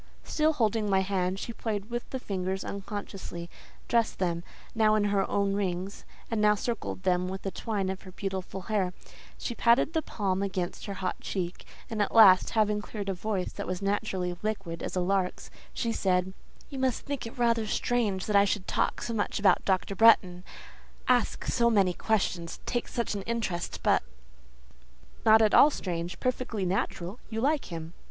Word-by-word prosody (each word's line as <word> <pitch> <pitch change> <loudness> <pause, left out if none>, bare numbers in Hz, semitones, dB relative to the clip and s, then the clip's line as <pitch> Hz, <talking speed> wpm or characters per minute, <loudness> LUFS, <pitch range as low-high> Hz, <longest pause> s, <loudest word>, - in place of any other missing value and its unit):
Still 310 0 +1
holding 220 -5 +1
my 190 -1 +3
hand, 190 -1 0
she 235 - -5
played 215 -1 -4
with 240 0 -4
the 265 - -3
fingers 190 -3 -3
unconsciously, 195 -4 -6 0.4
dressed 230 -1 +1
them, 170 -2 -1 0.3
now 215 -1 +4
in 215 - +2
her 195 -1 +1
own 200 -1 +1
rings, 190 -1 -3 0.3
and 225 -2 +1
now 210 0 +5
circled 230 -3 -4
them 180 -1 +2
with 190 +1 -6
a 195 - -1
twine 205 -3 -2
of 190 0 -3
her 185 - -11
beautiful 190 0 -4
hair; 190 -2 -1 0.4
she 240 - -4
patted 235 +6 +3
the 320 - +1
palm 195 -8 -2
against 190 -1 -3
her 200 - -4
hot 185 -1 -3
cheek, 180 -2 -4 0.2
and 220 -2 -2
at 205 - -1
last, 195 -5 +8
having 210 -1 +2
cleared 205 -1 -5
a - - +1
voice 190 0 -2
that - - -6
was 185 -1 -2
naturally 195 -3 -1
liquid 195 -6 -3
as - - -4
a 180 - +1
lark's, 185 0 -1 0.2
she 230 - -2
said:— 185 -3 +1 0.4
"You 270 - -5
must 260 -3 0
think 280 -4 -3
it 230 - -11
rather 230 -2 +2
strange 210 -5 0
that 210 - -1
I 200 - +7
should 200 -1 -1
talk - - 0
so 230 - -3
much 210 - -1
about 200 - +4
Dr. 190 0 +1
Bretton, 190 -4 +5 0.6
ask 245 -2 +2
so 235 -1 +3
many 195 -5 +3
questions, 180 -5 -1
take 240 -1 -1
such 235 -3 -2
an 200 - -3
interest, 205 -7 -2
but—". - - +4 1.3
"Not 220 0 +8
at 215 - +3
all 295 - +8
strange; 175 - -4
perfectly 250 -5 -1
natural; 185 +2 -2
you 225 -1 -3
like 285 +4 +1
him." 165 -1 -7
200 Hz, 180 wpm, -29 LUFS, 185-225 Hz, 1.3 s, last